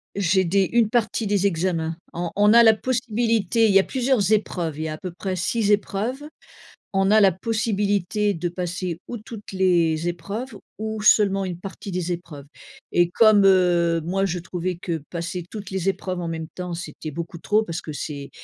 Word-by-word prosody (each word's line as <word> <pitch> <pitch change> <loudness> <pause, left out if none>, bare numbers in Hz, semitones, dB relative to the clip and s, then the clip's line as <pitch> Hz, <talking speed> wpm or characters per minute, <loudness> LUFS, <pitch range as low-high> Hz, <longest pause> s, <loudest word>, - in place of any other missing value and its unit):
J'ai 190 -1 +2
des 195 +2 +2
une 230 -3 +4
partie 230 -1 0
des 200 -1 +2
examens. 165 -2 -1 0.2
En 170 -1 -3
on 205 +2 +5
a 235 - +8
la 220 -1 +7
possibilité 230 -2 +1
il 205 - +3
y 195 - +7
a - - +3
plusieurs 250 -6 0
épreuves, 175 -7 0
il 155 - -3
y 160 - -2
a 155 - -4
à - - -7
peu 185 - -6
près 185 +2 -4
6 210 +4 0
épreuves. 210 +6 0 0.7
On 195 0 +2
a 215 - +6
la 195 -1 +6
possibilité 205 -1 0
de 175 0 -3
passer 175 -1 -4
ou 240 - -5
toutes 215 -1 -10
les 170 -3 +2
épreuves 200 +9 -6 0.2
ou 220 0 -4
seulement 200 -2 +4
une 175 -2 -5
partie 195 +1 -8
des 180 -1 -2
épreuves, 170 -5 -7 0.5
et 175 0 +3
comme, 215 0 +5
heu, 175 -3 +3
moi 190 +4 0
je 180 -2 -2
trouvais 180 +1 -4
que 165 -2 -4
passer 170 +1 -4
toutes 210 -3 -8
les 190 0 -2
épreuves 185 -1 -2
en 170 - -3
même 160 -1 -4
temps, 180 -1 -5
c'était 160 -2 -7
beaucoup 170 +3 -6
trop 215 +6 +1
parce 170 -4 -4
que 155 - -7
c'est, 145 -1 -6
190 Hz, 195 wpm, -23 LUFS, 170-210 Hz, 0.7 s, a